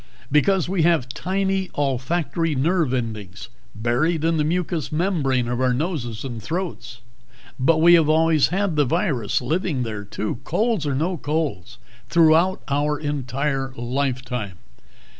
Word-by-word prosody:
Because 175 +5 +3
we 185 -1 0
have 160 -6 +2
tiny 190 +5 -1
olfactory 145 +4 -1
nerve 160 +1 +1
endings 110 -5 -4 0.3
buried 130 +9 0
in 165 0 +2
the 150 - +2
mucous 165 -1 -1
membrane 150 -8 0
of 120 +1 -2
our 125 -1 +2
noses 125 -7 -3
and 120 -4 -5
throats. 125 - -5 0.6
But 155 +5 +3
we 170 +2 +6
have 160 -3 +5
always 160 -1 +4
had 190 -3 -1
the 145 - +4
virus 130 - 0
living 155 -1 -1
there, 110 -3 -5
too, 105 +3 -4
colds 200 - 0
or 140 - 0
no 170 +6 -1
colds, 145 - -3 0.3
throughout 170 +3 +4
our 145 +1 0
entire 135 -1 -2
lifetime. 125 -5 -3
150 Hz, 140 wpm, -22 LUFS, 125-170 Hz, 0.6 s, we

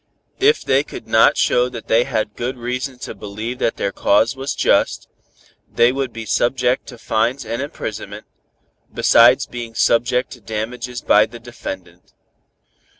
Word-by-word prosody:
If 435 +3 +3
they 135 +2 +3
could - - -10
not 110 - +4
show 125 +1 +2
that 115 -2 -9
they 115 +2 +3
had 110 -1 -2
good 125 +2 -4
reason 125 +2 -4
to - - -7
believe 110 +4 -6
that 115 - 0
their 100 - -1
cause 110 +5 +2
was 135 +1 -4
just, - - +1 0.6
they 120 +1 +4
would 135 -1 -3
be 115 -1 -7
subject 125 +3 0
to 125 - -10
fines 115 +3 -1
and 115 +3 -3
imprisonment, 140 - -6 0.7
besides - - +5
being 120 -2 -8
subject 120 +2 +2
to 120 - -11
damages 120 +3 -5
by 105 +1 +4
the 120 +1 -11
defendant. 95 -7 -9
120 Hz, 150 wpm, -19 LUFS, 110-125 Hz, 0.7 s, besides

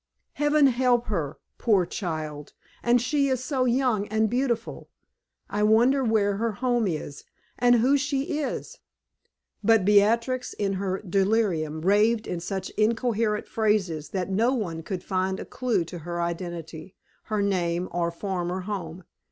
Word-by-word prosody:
Heaven 295 0 +3
help 250 -2 +3
her, 160 -8 -2 0.2
poor 200 -6 +3
child! 155 -6 -5 0.3
And 240 +1 +3
she 280 +3 +1
is 260 -2 -1
so 260 -1 0
young 240 -4 +1
and 220 0 +1
beautiful. 245 -2 -2 0.6
I 205 - -2
wonder 235 +6 +4
where 210 -4 +2
her 230 +1 -1
home 240 0 0
is, 150 -4 -5 0.4
and 245 0 +5
who 255 +5 +4
she 285 +1 -1
is?" 285 - -4 0.8
But 225 -4 +4
Beatrix, 230 +5 +3
in 200 -1 -1
her 190 0 -2
delirium, 190 -5 +1
raved 210 +5 +3
in 175 - -3
such 190 +2 -4
incoherent 225 -1 0
phrases 195 -8 0
that 190 0 -3
no 230 +7 +2
one 170 -9 -3
could 180 +2 -5
find 190 0 -1
a - - -6
clew 245 -9 -1
to 175 +1 -8
her 170 +2 -5
identity, 170 0 -5 0.3
her 210 -2 -1
name, 180 -2 0
or 170 -1 0
former 180 0 -3
home. 185 -3 -5
210 Hz, 145 wpm, -26 LUFS, 180-240 Hz, 0.8 s, and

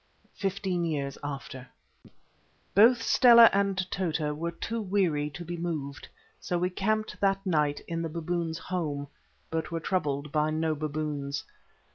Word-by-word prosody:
FIFTEEN 190 -2 -2
YEARS 145 -4 -2
AFTER 135 -2 -6 1.1
Both 230 +3 +6
Stella 235 -2 +8
and 200 -1 +1
Tota 160 -5 -1
were 165 +3 -3
too 225 +7 -4
weary 180 -7 +1
to 175 +4 -8
be 175 +1 -4
moved, 155 -5 -4 0.3
so 175 - -2
we 180 +1 0
camped 215 +4 -1
that 195 0 +1
night 150 -5 +1
in 165 0 -2
the 165 - -3
baboons' 165 0 -2
home, 150 -6 -3 0.4
but 160 -1 -2
were 165 -1 -2
troubled 150 -5 -1
by 150 0 +2
no 160 0 0
baboons. 145 -1 -3
165 Hz, 140 wpm, -28 LUFS, 150-190 Hz, 1.1 s, Stella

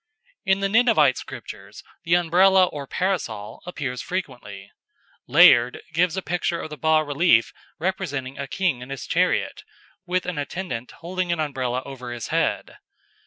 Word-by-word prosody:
In 190 +1 +3
the 195 - +2
Ninevite 205 - +4
sculptures - - -10 0.2
the 170 +1 +3
Umbrella 185 +2 +5
or 145 -5 -7
Parasol 130 - -3
appears 135 -8 -4
frequently. 115 - -6 0.6
Layard 120 +1 +6
gives 175 +2 +1
a 190 - -2
picture 170 0 -1
of 155 - -7
a - - -5
bas 155 +1 +2
relief 145 -5 +3 0.2
representing 155 -7 -3
a 140 - -4
king 165 -5 -1
in 125 - -9
his 135 -2 -6
chariot, - - 0 0.5
with 180 0 0
an 175 -5 -3
attendant 145 -5 -5
holding 180 +1 -2
an 170 - -1
Umbrella 130 -4 -2
over 125 -3 -8
his 120 -3 -6
head. - - -1
155 Hz, 150 wpm, -23 LUFS, 130-180 Hz, 0.6 s, Layard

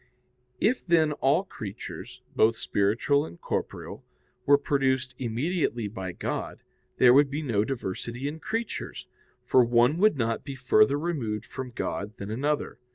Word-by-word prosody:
If 245 +4 +2
then 165 -3 +3
all 145 +5 +2
creatures, 110 - -8
both 115 +1 +4
spiritual 115 +8 +1
and 85 +1 -10
corporeal, - - -4 0.4
were 145 0 +7
produced 130 -3 0
immediately 125 - -1
by 95 -3 -5
God, - - -4 0.3
there 125 -1 +7
would 140 +1 +5
be 145 +3 -3
no 110 -7 +1
diversity 120 +2 -4
in 155 +2 -5
creatures, 225 +6 -4 0.4
for 130 - +5
one 120 +6 +3
would 215 -5 +4
not 115 -2 -1
be 140 - -6
further 130 0 +4
removed 125 -10 -2
from 130 -1 -6
God 105 -3 -4
than 100 +1 -6
another. 145 +6 -1
130 Hz, 145 wpm, -27 LUFS, 115-145 Hz, 0.4 s, were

